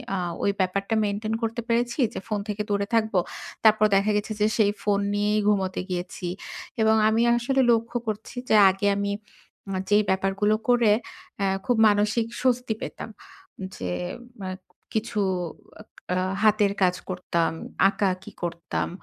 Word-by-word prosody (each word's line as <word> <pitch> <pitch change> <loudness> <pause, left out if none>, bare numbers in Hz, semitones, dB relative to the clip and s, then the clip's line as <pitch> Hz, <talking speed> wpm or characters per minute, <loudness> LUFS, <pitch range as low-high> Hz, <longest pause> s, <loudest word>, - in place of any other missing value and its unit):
আ - - -1 0.3
ওই 200 - +3
ব্যাপারটা 195 +4 0
মেইনটেইন 210 +2 -2
করতে 225 +1 -1
পেরেছি 235 +3 0
যে - - -4
ফোন 210 -2 -1
থেকে 210 0 -3
দূরে 200 0 +1
থাকব। 220 -1 +1 0.5
তারপর 215 -1 +6
দেখা 200 +2 +3
গেছে 210 +1 -3
যে 210 - +5
সেই 210 -3 +4
ফোন 205 -1 +2
নিয়েই 210 +1 +1
ঘুমুতে 190 -3 +1
গিয়েছি। 180 0 -4 0.5
এবং 220 0 +4
আমি 220 +1 +2 0.2
আসলে 265 +3 +1
লক্ষ্য 230 +1 +1
করছি 215 +2 -4
যে 220 - +5
আগে 195 +2 -1
আমি 200 0 -1 0.6
আ - - 0
যেই 210 +1 +5
ব্যাপারগুলো 195 +3 +2
করে 235 -3 +5 0.5
অ্যা 195 - +1 0.2
খুব 245 -2 +2
মানসিক 210 +2 +2
স্বস্তি 250 -2 +1
পেতাম। - - -6 0.7
যে 90 -1 -4 0.5
মা 190 -1 -5 0.4
কিছু 220 -1 -1 0.9
আ 180 - 0 0.3
হাতের 210 -2 +4
কাজ 180 -1 +3
করতাম, 175 -2 0 0.4
আঁকাআঁকি 195 0 -2
করতাম। 170 0 -3
210 Hz, 145 wpm, -25 LUFS, 195-220 Hz, 0.9 s, তারপর